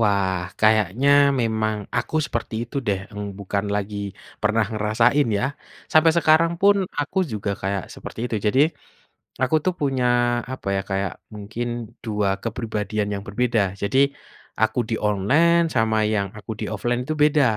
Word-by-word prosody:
Wah, 100 -3 +2 0.2
kayaknya 110 +4 +3 0.3
memang 110 -1 0 0.2
aku - - -1
seperti 115 -1 -4
itu 120 - -9
deh, 100 -2 +1
mmm, 105 0 -5
bukan 100 0 -2
lagi 105 0 -2 0.5
pernah 110 +1 +2
ngerasain 115 +7 +2
ya, - - 0 0.5
sampai 155 +1 +6
sekarang 165 0 +4
pun 200 +1 +6 0.2
aku 145 +6 -2
juga 105 -1 -2
kayak 95 -1 -1
seperti - - -9
itu 120 -2 -2
jadi, 120 +6 +3 0.8
aku 130 +4 +1
tuh 185 - +2
punya 135 -3 0 0.5
apa 130 - -6
ya - - +1
kayak 95 -1 -1 0.2
mungkin 110 +3 -5 0.4
2 105 -3 0
kepribadian 110 -2 -2
yang 100 - -4
berbeda 120 +2 +1 0.2
jadi, 100 +6 +1 0.6
aku 110 +2 +2
di - - +1
online 145 - +3
sama 110 -2 +2 0.2
yang 100 -1 +1
aku 110 - -10
di - - -2
offline 120 +3 -1
itu 155 - -1
beda 150 0 +4
110 Hz, 150 wpm, -23 LUFS, 105-130 Hz, 0.8 s, sampai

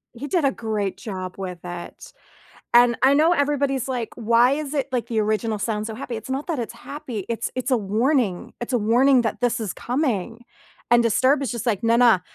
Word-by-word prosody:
He 280 +5 -6
did 345 -4 +1
a 275 - +3
great 215 -5 -3
job 185 -5 -6
with 185 -2 -5
it, 175 0 -8 0.6
and 240 0 +6
I 270 - +6
know 315 +4 +4
everybody's 280 -3 0
like, 245 -3 -3
"Why 235 +3 +3
is 295 -1 -4
it, 280 -2 -1
like, 250 -2 -1
the 225 -2 -1
original 215 0 0
sound 215 -1 -2
so 225 - -5
happy?" 240 0 -6
It's 220 +3 -8
not 270 +2 -3
that 330 -4 -2
it's 235 -3 -4
happy, 245 -9 -7
it's 230 0 -2
it's 255 - -2
a 250 - +4
warning, 220 - 0
it's 240 +2 -5
a 245 - +3
warning 245 +4 +4
that 225 +1 -3
this 240 -1 +1
is 215 -4 -3
coming, 235 - -2 0.5
and 240 0 +5
disturbed 260 +5 +3
is 250 - -2
just 235 +1 -4
like, 210 -2 0
"Na, 230 +1 +3
na, 235 -5 +5
235 Hz, 215 wpm, -23 LUFS, 220-265 Hz, 0.6 s, and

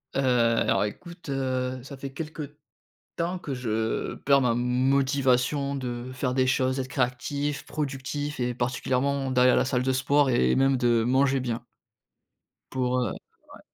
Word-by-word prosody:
Heu, - - +1
alors, 115 -5 +2
écoute, 170 - -8
heu, 130 -1 -2
ça 140 +1 -9
fait 135 0 -7
quelques 150 0 -6 0.6
temps 175 +2 -2
que 145 -5 -5
je 110 -3 -2
perds 140 0 +3
ma 125 -3 +2
motivation 135 +2 +1
de 125 -1 -5
faire 125 0 -2
des 130 0 +2
choses, 130 0 +1
être 130 - -4
créatif, 140 +2 -2
productif 145 -1 -4
et 125 0 0
particulièrement, 130 +3 -1
d'aller 125 0 +5
à - - +4
la - - +3
salle 125 -1 0
de 130 - +2
sport 140 +2 +2
et 65 - +3
même 135 0 +3
de 120 -2 +2
manger 135 +2 +3
bien 120 -2 -3 1.1
pour 125 -1 0
heu 120 -6 -1 0.4
Ouais. - - -13
130 Hz, 155 wpm, -26 LUFS, 125-140 Hz, 1.1 s, d'aller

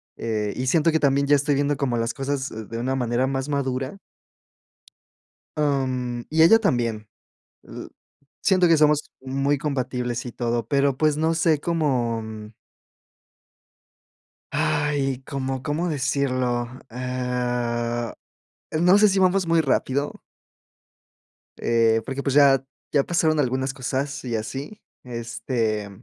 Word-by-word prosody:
eh, 105 -3 -2
y 130 - -3
siento 165 +3 +3
que 160 - +3
también 140 0 +2
ya 145 - +6
estoy 145 0 +1
viendo 145 +1 +1
como 135 -4 -1
las 115 0 -1
cosas 135 -1 -2 0.2
de 115 - -5
una 130 +3 -1
manera 125 0 0
más 135 +1 -2
madura. 135 +3 -2 1.6
Mm, 130 -4 0
y 160 +1 +3
ella 195 +8 +8
también, 115 - -1 0.6
l - - -9 0.5
siento 185 -3 +4
que 165 - +5
somos 150 -1 +3
muy 135 +2 0
compatibles 125 -4 -2
y 120 - -6
todo, 120 -2 -2
pero, 140 0 +2
pues, 155 0 +2
no 160 +2 +1
sé 160 -2 +2
cómo 130 -9 0 2.3
Ay, 140 -3 0
¿cómo 135 -1 -3
cómo 160 +4 -1
decirlo?, 130 -4 0 0.2
eh, 120 -1 -2 0.6
no 180 +5 +5
sé, 210 0 +6
si 195 0 +1
vamos 185 -1 +3
muy 165 -1 +3
rápido. 140 +1 -1 1.4
Eh, 115 -1 +2
porque, 135 +3 -4
pues, 140 -1 -1
ya 135 -2 +6 0.3
ya 140 -2 +3
pasaron 160 -3 +2
algunas 130 +1 -1
cosas 135 +2 -3
y 120 -2 -2
así, 135 - -6 0.2
este, 115 -3 -2
135 Hz, 125 wpm, -24 LUFS, 120-150 Hz, 2.3 s, ella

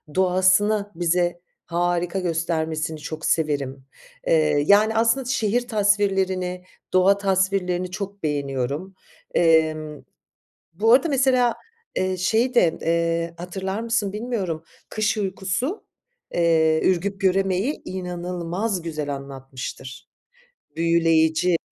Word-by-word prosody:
doğasını, 190 +3 +3
bize 175 0 0 0.2
harika 175 +1 -1
göstermesini 160 -2 -2
çok 155 +1 -6
severim, 140 -4 -1 0.4
eee, 155 -2 +3
yani 215 +2 +5
aslında 230 +4 +2
şehir 245 -1 0
tasvirlerini, 195 -4 +1 0.3
doğa 190 +2 +5
tasvirlerini 190 -2 0
çok 200 -1 -6
beğeniyorum. 145 +4 -2 0.4
Emm, 155 -3 +2 0.7
bu 225 +7 +3
arada 275 +6 +5
mesela, 255 -3 +3 0.4
eee, 185 0 0
şeyi 225 +7 +1
de, 175 -10 +3
eee, 165 0 0
hatırlar 190 +3 -4
mısın 225 -4 -1
bilmiyorum, 205 -8 -3 0.3
Kış 215 0 0
Uykusu, 195 - -2 0.5
eee, 160 -2 +3
Ürgüp 195 +2 0
Göreme'yi 195 +6 +1
inanılmaz 180 +2 -3
güzel 150 -4 -4
anlatmıştır. 135 -1 -8 0.7
Büyüleyici. 165 0 +3
180 Hz, 95 wpm, -23 LUFS, 165-200 Hz, 0.7 s, yani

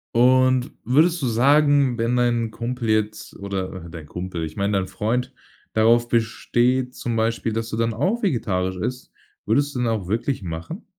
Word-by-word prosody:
Und 130 +1 +4
würdest 160 +6 +3
du - - 0
sagen, 140 +2 +4
wenn 115 +2 0
dein 120 -2 +1
Kumpel 120 +1 -4
jetzt 110 0 -1
oder 95 -2 -4
äh, - - -9
dein 80 -2 -9
Kumpel, 90 +1 -5
ich 80 - -8
meine 100 0 0
dein 95 -1 -1
Freund 120 +7 -2 0.4
darauf 115 +2 +4
besteht 120 +2 +1
zum 120 -1 -3
Beispiel, 115 0 0
dass 115 +1 -2
du - - -3
dann 115 0 0
auch 195 - -1
vegetarisch 95 - 0
isst, 125 +8 -4 0.3
würdest 140 +6 +1
du - - -1
den 120 -1 +1
auch 105 -5 -2
wirklich 115 +5 -1
machen? 85 - -6
115 Hz, 175 wpm, -23 LUFS, 105-125 Hz, 0.4 s, Und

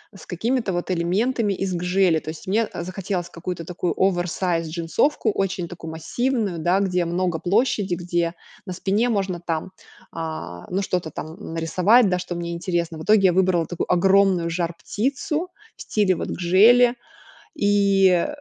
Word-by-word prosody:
с - - -13
какими-то 225 +2 -1
вот 175 +1 -2
элементами 200 +5 0
из 190 0 -3
гжели. 180 -1 +2
То 155 - -8
есть 160 +3 -9
мне, 215 +3 +1
э, - - -5
захотелось 185 -1 -4
какую-то 170 -1 -6
такую 180 0 -2
оверсайз 175 -2 0
джинсовку, 180 - 0
очень 190 -3 -2
такую 165 -2 -8
массивную, 200 +3 -2
да, 175 +4 +2
где 180 -3 0
много 175 -1 -1
площади, 200 -1 +1
где 175 -1 -1 0.3
на 185 - -5
спине 205 +6 0
можно 195 -5 -1
там, 165 +1 -4 0.4
а, 125 - -6
ну, 190 +2 -1
что-то 180 -4 -2
там 160 +3 -8
нарисовать, 185 +8 +3
да, 180 -1 0
что 175 -1 -5
мне 170 0 -4
интересно. 170 -1 -2
В 155 - -7
итоге 210 +2 +4
я 180 - +3
выбрала 180 -3 +2
такую 175 - -3
огромную 190 -1 +3
жар-птицу 235 - -2 0.3
в - - -13
стиле 200 -4 +1
вот - - -4
гжели, 230 +8 +5 0.6
и 195 -3 +3
180 Hz, 155 wpm, -23 LUFS, 170-200 Hz, 0.6 s, гжели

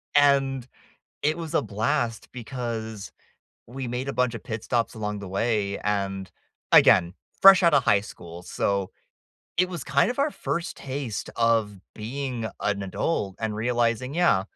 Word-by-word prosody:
And 135 -3 +3 0.5
it 155 +3 +1
was 165 -1 -6
a - - +3
blast 115 +2 -1
because 115 -4 -5 0.5
we 130 +1 -5
made 125 +3 -3
a - - -2
bunch 125 0 +1
of 115 - -7
pit 110 -1 -5
stops 120 -1 -1
along 105 -1 -3
the 100 - -7
way 100 0 0
and, 95 -2 -2 0.4
again, 85 -1 +6 0.3
fresh 195 -1 +10
out 170 -4 +5
of 135 - +4
high 100 -4 +4
school. 85 -4 -10
So, 100 +1 -1 0.7
it 180 +1 +3
was 170 -6 -6
kind 140 - +2
of 250 - -5
our 285 +1 +1
first 170 - -3
taste 130 -5 -5
of 115 -4 +2 0.2
being 120 +1 -4
an 100 -1 -1
adult 95 - -2
and 110 -2 -2
realizing, 120 +3 0
"Yeah, 170 - +3
115 Hz, 155 wpm, -25 LUFS, 105-140 Hz, 0.7 s, fresh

